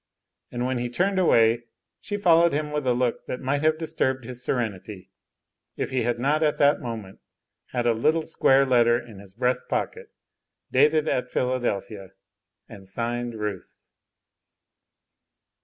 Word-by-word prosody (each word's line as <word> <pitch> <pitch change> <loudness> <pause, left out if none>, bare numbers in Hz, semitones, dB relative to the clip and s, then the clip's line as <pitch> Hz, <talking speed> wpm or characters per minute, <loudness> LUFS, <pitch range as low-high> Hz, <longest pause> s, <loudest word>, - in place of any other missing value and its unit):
And 120 0 -2
when 130 -1 -1
he 120 0 -2
turned 190 +9 0
away 115 -8 +3 0.3
she 205 - -4
followed 170 -4 +4
him 150 +1 -2
with 150 -3 -2
a 125 - +4
look 125 -1 -1
that 125 - -4
might 140 +2 -1
have 155 0 +2
disturbed 130 -5 -1
his 125 +1 -7
serenity, 105 -6 -4 0.7
if - - -3
he 130 -1 0
had 120 +1 0
not 145 +6 +1
at 150 -2 +2
the 145 0 +4
moment 110 -5 -7 0.5
had 120 -1 -2
a 120 - +4
little 155 +8 +1
square 135 -3 +3
letter 120 -2 +4
in 115 -5 -12
his 100 -1 -14
breast 125 +1 0
pocket, - - -3 0.6
dated 150 +3 +3
at 125 -3 -1
Philadelphia, 110 -7 -2 0.5
and 95 -1 -12
signed 120 +3 -3
"Ruth." 105 -3 -6
125 Hz, 150 wpm, -25 LUFS, 115-145 Hz, 0.7 s, followed